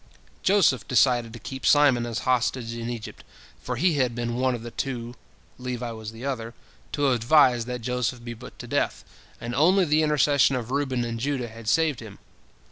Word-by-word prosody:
Joseph 185 - +3
decided 120 -2 +3
to - - -7
keep 130 +3 -8
Simon 135 -5 +4
as 115 - -3
hostage 125 -2 0
in 115 0 -5
Egypt, 115 -3 -7 0.4
for - - -4
he 175 -4 +2
had 125 -3 +1
been 120 -1 -2
one 130 +1 +1
of 115 - -8
the 120 - -7
two—Levi 125 0 -6
was 110 -1 -7
the 115 +4 -9
other—to 135 +2 -3
advise 125 0 +4
that 125 0 -5
Joseph 125 0 -2
be 120 0 -6
put 120 +2 -12
to - - -8
death, - - -1 0.4
and 120 +1 -5
only 180 +8 +4
the 155 0 +3
intercession 145 -3 +3
of 125 -1 -4
Reuben 130 -3 0
and 115 -1 -4
Judah 130 -2 -2
had 115 0 -12
saved 155 +1 +2
him. 110 -3 -10
125 Hz, 180 wpm, -25 LUFS, 115-135 Hz, 0.4 s, Simon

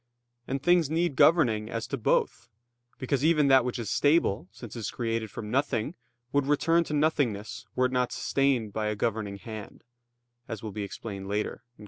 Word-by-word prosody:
And 135 +1 -3
things 175 -4 +4
need 165 -2 0
governing 120 -10 +4
as 115 0 -3
to - - -3
both: 120 - 0 0.5
because 130 +1 -1
even 150 -3 +4
that 130 -1 +6
which 125 +1 -2
is 115 -3 -4
stable, 145 - +2
since 120 0 -10
it - - -5
is 105 - -3
created 115 -2 -2
from 105 +1 -7
nothing, 135 0 0 0.4
would 140 -1 +1
return 165 +3 +3
to 150 - -3
nothingness 140 -9 0
were 130 - +3
it 125 - 0
not 125 -1 +1
sustained 130 -7 0
by 110 0 -1
a 105 - -1
governing 105 -1 -2
hand, 105 +1 -9 0.6
as 110 -2 -6
will 110 - -4
be 105 - -5
explained 100 -1 -6
later 105 +4 -3
(Q. - - -36
120 Hz, 185 wpm, -28 LUFS, 110-145 Hz, 0.6 s, that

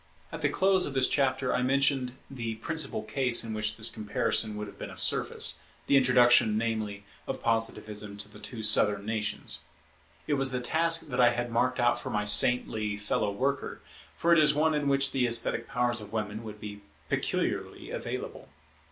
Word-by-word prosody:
At - - -7
the - - +1
close 190 -1 +2
of 140 - -7
the - - +2
last 130 - +4
chapter 130 -2 0
I 125 - 0
mentioned 135 -1 +1
the 115 -4 -5
principal 160 +8 -2
case 125 -4 +3
in 115 -1 -5
which 105 0 -2
this 110 0 +2
comparison 105 0 -1
would 105 - -5
have 100 - -13
been - - -6
of - - -11
service, - - +2 0.3
the - - +2
introduction, 125 -4 +4
namely, 110 -3 -3 0.2
of - - -5
Positivism 105 -2 -2
to 105 0 -8
the 105 0 -15
two 110 +1 -6
Southern 105 -1 +4
nations. 110 -1 -2 0.7
It 150 - -1
was 135 - +2
the 125 - -2
task 165 +4 +2
that 125 -1 0
I 120 -1 +5
had 120 0 -4
marked 125 +2 0
out 120 0 +2
for - - -6
my 105 0 -2
saintly 105 -1 +2
fellow 105 0 -2
worker, 140 +7 -3 0.3
for 170 0 +2
it 165 - +5
is 150 -2 +3
one 155 +1 +2
in 150 -1 -1
which 140 0 +2
the 130 -2 0
esthetic 115 0 0
powers 120 -1 -1
of 105 - -10
women 110 0 -4
would 105 -1 -9
be 105 -1 -9 0.3
peculiarly - - -3
available. - - -6
120 Hz, 190 wpm, -28 LUFS, 105-135 Hz, 0.7 s, I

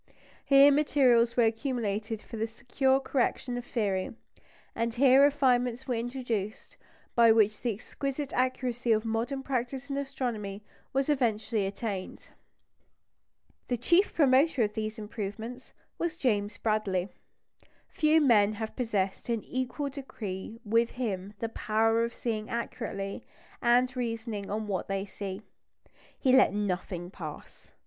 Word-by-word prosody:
Here 275 +1 +7
materials 255 -5 +3
were 240 - +5
accumulated 225 -2 -1
for - - -9
the 225 0 -1
secure 265 +4 +1
correction 255 -2 -1
of 245 - -4
theory, 205 -5 -2 0.6
and 230 0 -1
here 265 +1 +6
refinements 260 -3 +2
were 250 - 0
introduced 230 -3 -3 0.4
by 230 -1 +6
which 215 -1 +3
the 240 - 0
exquisite 275 +6 -4
accuracy 250 -1 0
of 215 +1 0
modern 235 +5 -2
practice 265 +1 -3
in 275 - -1
astronomy 240 -8 -4 0.3
was 270 0 0
eventually 225 -7 +1
attained. 195 -1 -5 1.4
The 245 - 0
chief 345 - +3
promoter 275 -2 +4
of 210 0 -1
these 215 +1 -3
improvements 220 +3 -6 0.3
was 340 -1 -2
James 205 -6 0
Bradley. 205 -4 0 0.8
Few 310 0 +3
men 215 -7 +5
have 220 +1 -5
possessed 210 -5 -2
in 230 -2 0
an - - -21
equal 260 +3 -3
degree 225 -6 -7
with 230 +2 +3
him 205 -5 -4
the 230 +2 -3
power 225 +1 +1
of 235 0 -3
seeing 215 -3 -3
accurately, 200 -4 -4 0.4
and 250 +1 +3
reasoning 230 -4 -3
on 215 +1 -2
what 195 -4 -2
they 195 0 -2
see. 195 0 -6 0.7
He 260 -2 +2
let 255 -6 +5
nothing 180 -3 -3
pass. 155 -6 -9
230 Hz, 135 wpm, -29 LUFS, 210-255 Hz, 1.4 s, Here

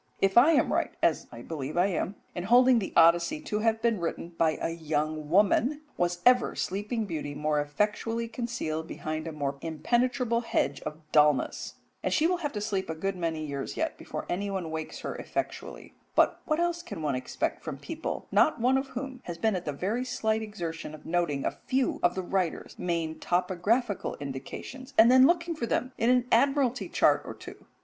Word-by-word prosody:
If 195 0 +2
I 270 +8 +7
am 290 - +3
right, - - +1
as - - +2
I - - -9
believe 150 -1 -5
I 175 - +5
am, 195 +1 -1 0.2
in 175 - -4
holding 245 +2 +6
the 195 - -4
Odyssey 170 - +5
to 215 -9 -2
have 225 0 +1
been 230 -4 +2
written 170 0 -3
by 165 -2 +1
a - - -1
young 155 -2 -2
woman, 210 - +3
was 175 0 -1
ever 250 -1 +5
sleeping 210 +4 -2
beauty 150 -6 -4
more 150 0 +1
effectually 210 +9 -1
concealed 225 -10 -3
behind 155 -1 -4
a - - -3
more 140 -2 -3
impenetrable 235 - 0
hedge 230 - -1
of 150 - -5
dulness? 150 -2 +2 0.3
and - - -1
she 320 - +3
will 360 +1 +2
have 300 -5 -3
to 210 - -3
sleep 200 -4 -2
a 160 - -2
good 195 +4 -2
many 165 -3 -2
years 140 -2 -5
yet - - -1
before - - -6
anyone 190 -3 -2
wakes 160 0 -5
her - - -4
effectually. - - -5 0.2
But - - +3
what 310 0 0
else 345 0 0
can 205 - -7
one 145 -2 0
expect 130 0 -3
from - - -5
people, 325 -1 -5
not 310 - +4
one 255 +3 +3
of 270 - -5
whom 260 0 -6
has 170 -1 -5
been 220 +4 +1
at 180 - -4
the 150 - -1
very 200 - -2
slight 220 -3 0
exertion 170 -7 -5
of 155 - -16
noting 165 -5 0
a - - +1 0.2
few 260 0 +1
of 175 - +2
the 190 - -2
writer's 180 -2 -2
main 165 -3 -2
topographical 190 +5 0
indications, 145 - -7
and 230 +2 +8
then 260 +1 +8
looking 340 0 +1
for 235 -6 -3
them 255 +3 -1
in 230 - +3
an 250 -1 +4
Admiralty 260 0 +2
chart - - +3
or - - -7
two? - - -12
195 Hz, 195 wpm, -28 LUFS, 160-245 Hz, 0.3 s, and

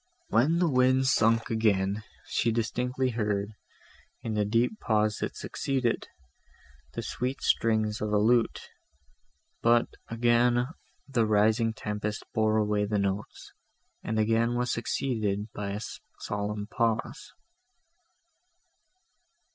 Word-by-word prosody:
When 135 +10 +3
the 175 0 +3
wind 130 -1 +3
sunk 115 -4 +3
again, 105 -2 +1 0.2
she 115 - 0
heard 115 - -1
distinctly, 125 +2 -1 1.1
in 115 - -3
the 105 -1 +1
deep 115 - +1
pause 105 -2 +1
that - - -4
succeeded, 130 -4 -1 0.9
the - - -4
sweet 130 +2 -3
strings 110 -2 +1
of 105 0 -1
a 105 - +3
lute; 115 +2 +2 0.9
but 120 0 +4 0.2
again 120 +1 +3 0.4
the 120 -5 +1
rising 110 +2 +3
tempest 105 0 -3
bore 110 -1 +2
away 105 -1 +1
the 105 0 -1
notes, 100 +1 -3 0.5
and 110 - -3
again 115 +2 +2
was 125 0 0
succeeded 110 -4 -1
by 100 -1 -4
a 105 - -4 0.4
solemn 105 0 -3
pause. 115 +1 -2
110 Hz, 115 wpm, -28 LUFS, 105-120 Hz, 1.1 s, but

